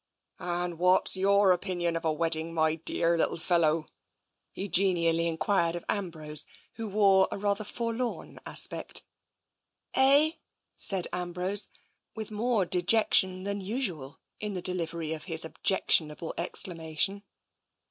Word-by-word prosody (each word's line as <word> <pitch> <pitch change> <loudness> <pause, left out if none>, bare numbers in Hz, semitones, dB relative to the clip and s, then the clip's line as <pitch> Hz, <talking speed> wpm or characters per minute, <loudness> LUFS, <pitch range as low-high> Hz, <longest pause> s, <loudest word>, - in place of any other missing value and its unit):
" - - -40
And 175 -1 -3
what's 180 +2 +3
your 200 +1 +3
opinion 175 -2 -1
of 165 - -3
a 160 - +1
wedding, 165 +1 +1
my 160 -1 +2
dearr 165 +1 0
little - - 0
fellow? 165 -2 +1 0.3
" - - -51
he 195 - -5
genially 170 -4 +1
enquired 170 +1 0
of 175 - -7
Ambrose, 155 -6 0 0.3
who 225 -1 -6
wore 195 -2 +3
a - - -5
rather 200 +1 -1
forlorn 230 +3 -5
aspect. - - 0 0.9
"Eh?" 280 +4 +6 0.4
said 190 -3 +2
Ambrose, 180 +3 0 0.5
with 220 -1 -7
more 215 -1 0
dejection 185 0 +2
than 200 0 -3
usual 185 - -4 0.2
in 210 -1 -4
the 185 - -4
delivery 165 -3 -1
of 155 - -7
his 165 -3 +2
objectionable 160 -2 0
exclamation. 170 +2 0
180 Hz, 130 wpm, -28 LUFS, 165-200 Hz, 0.9 s, Eh